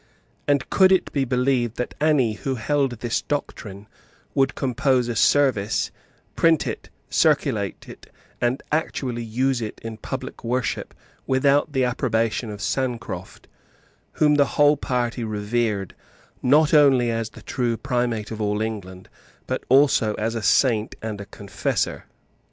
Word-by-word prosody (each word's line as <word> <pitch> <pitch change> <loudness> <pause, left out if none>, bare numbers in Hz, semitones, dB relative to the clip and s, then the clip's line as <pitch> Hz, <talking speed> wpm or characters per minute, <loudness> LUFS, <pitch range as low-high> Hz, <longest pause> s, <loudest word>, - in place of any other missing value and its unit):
And 140 -2 +2
could 190 -1 +5
it 190 - +2
be 140 -2 +1
believed 125 -2 0
that 125 - -3
any 145 -8 +3
who 130 +5 -3
held 135 +3 0
this 120 -2 -1
doctrine 105 -8 -5 0.5
would 135 -2 +1
compose 130 -1 +1
a 120 - -3
service, 115 -5 +2 0.4
print 165 -2 +3
it, - - -5 0.2
circulate - - +1
it, - - -13 0.3
and 120 +3 0
actually 130 -6 -1
use 125 +3 0
it 110 - -5
in 115 -1 -6
public - - -6
worship, 125 +1 -2 0.3
without 140 +2 +2
the 130 -2 +2
approbation 115 -2 0
of 105 -1 -6
Sancroft, 125 -3 -4 0.7
whom 150 -1 +3
the 145 -1 +4
whole 145 0 +6
party 125 -3 -2
revered, 105 -2 -2 0.5
not 150 +5 +4
only 135 -5 +5
as 115 -1 -2
the - - -14
true 120 -3 -1
Primate 120 -5 -2
of 110 -1 -5
all 105 0 0
England, 100 -4 -5 0.4
but - - -3
also 130 -5 +4
as 110 +2 -2
a 115 - -3
Saint 110 -1 +2
and 105 -2 -4
a 100 - -9
Confessor? 100 0 -3
125 Hz, 140 wpm, -23 LUFS, 110-135 Hz, 0.7 s, whole